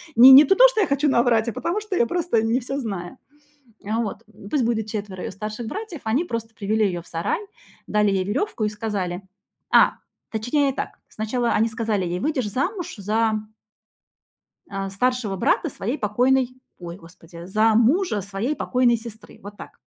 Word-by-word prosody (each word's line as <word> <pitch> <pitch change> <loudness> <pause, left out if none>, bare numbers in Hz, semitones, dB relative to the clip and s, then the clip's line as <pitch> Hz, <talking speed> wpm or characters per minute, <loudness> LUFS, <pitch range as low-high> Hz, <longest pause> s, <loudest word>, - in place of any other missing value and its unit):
Не 255 +3 +10
не 275 +3 +11
ту 390 - +3
то, - - +8
что 440 -4 0
я - - +2
хочу 280 +1 +1
наврать, 235 -3 +2
а - - -5
потому 395 +5 -2
что 410 -3 -4
я 235 - +3
просто 335 -6 0
не 225 +3 +1
всё 270 +2 -5
знаю. 200 -5 -5 0.7
А, 215 +3 -2
вот. 215 -4 -5
М, 200 -2 -13
пусть 280 -5 +2
будет 225 -2 0
4 205 -4 -5
её - - -4
старших 215 +4 -6
братьев, 400 - -6
они 245 +10 0
просто 230 -6 -5
привели 215 +1 0
её 175 -3 -2
в - - -20
сарай, 165 0 -2 0.5
дали 210 -1 +2
ей 190 -1 +1
верёвку 235 - -2
и 210 - +1
сказали. 205 -4 -4 0.5
А! - - +6 0.4
Точнее 265 +6 0
так, - - -6
сначала 235 +2 -2
они 225 +2 +2
сказали 220 -4 -1
ей: 175 +1 -3
"Выйдешь 260 -7 -1
замуж 350 - -3
за" 215 +2 0 1.3
"а, 195 -1 -4
старшего 225 0 -1
брата - - +1
своей 240 +9 -3
покойной 250 +4 +1 0.3
ой, 170 0 -8
господи,- 170 -1 -13
за 215 +4 +2
мужа 240 - +2
своей 200 +9 -3
покойной 250 -4 +2
сестры". 225 -1 -11
Вот 205 +1 -10
так. - - -11
225 Hz, 180 wpm, -23 LUFS, 205-260 Hz, 1.3 s, не